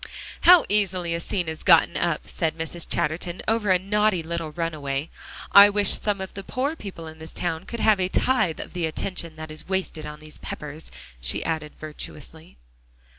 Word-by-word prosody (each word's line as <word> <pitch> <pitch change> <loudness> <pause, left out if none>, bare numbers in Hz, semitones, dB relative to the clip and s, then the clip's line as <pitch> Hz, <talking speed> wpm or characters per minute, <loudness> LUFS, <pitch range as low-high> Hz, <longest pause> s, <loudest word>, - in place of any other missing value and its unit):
"How 355 0 +8
easily 185 -4 +1
a 170 - -1
scene 175 0 -2
is 160 0 -5
gotten 165 -4 +5
up," 170 -3 -1
said 160 -2 -2
Mrs. 165 +1 -3
Chatterton, 170 +2 -2
"over 220 -2 +1
a 185 - +6
naughty 205 -1 +1
little 165 -1 -4
runaway. 150 -3 -3 0.4
I 200 +1 +10
wish 205 -1 +2
some 205 -2 0
of 190 0 -6
the 195 - -6
poor 265 +9 -2
people 195 - -8
in 160 0 -10
this 160 +1 -9
town 165 -2 -3
could 235 - -5
have 215 -3 +4
a 185 - +1
tithe 215 -8 +1
of - - -7
the 175 -2 -1
attention 165 0 -4
that 155 0 -8
is 155 +4 -7
wasted 185 -5 -2
on 150 0 -8
these 155 0 -4
Peppers," 150 +1 -7 0.3
she - - -1
added 155 -2 -2
virtuously. 155 - -9
170 Hz, 185 wpm, -25 LUFS, 155-195 Hz, 0.4 s, I